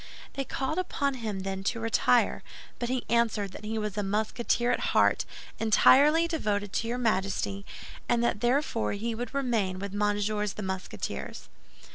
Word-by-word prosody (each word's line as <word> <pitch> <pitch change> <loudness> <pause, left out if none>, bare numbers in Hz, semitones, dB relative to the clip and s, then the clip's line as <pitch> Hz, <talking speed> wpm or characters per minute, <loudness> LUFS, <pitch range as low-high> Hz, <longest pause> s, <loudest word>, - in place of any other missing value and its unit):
They 275 0 -3
called 270 +7 -2
upon 280 -6 -1
him 220 -6 -4
then 190 0 -4
to 230 - 0
retire; 225 0 +2 0.4
but 240 - -2
he 255 -1 -1
answered 225 -4 +1
that 205 - -10
he 220 +1 -2
was 210 -2 -3
a 210 - 0
Musketeer 220 +4 0
at - - +1 0.2
heart, - - +4 0.3
entirely 290 +9 +5
devoted 205 - -1
to 230 - -1
your 240 +1 -1
Majesty, 200 -3 -1 0.4
and 235 0 +2
that 220 -3 0
therefore 245 -2 +1
he 225 +3 -2
would 235 +1 -5
remain 225 -9 0
with 200 +1 -5
Messieurs 205 0 0
the 210 - -6
Musketeers." 190 -1 -5
220 Hz, 160 wpm, -28 LUFS, 205-245 Hz, 0.4 s, entirely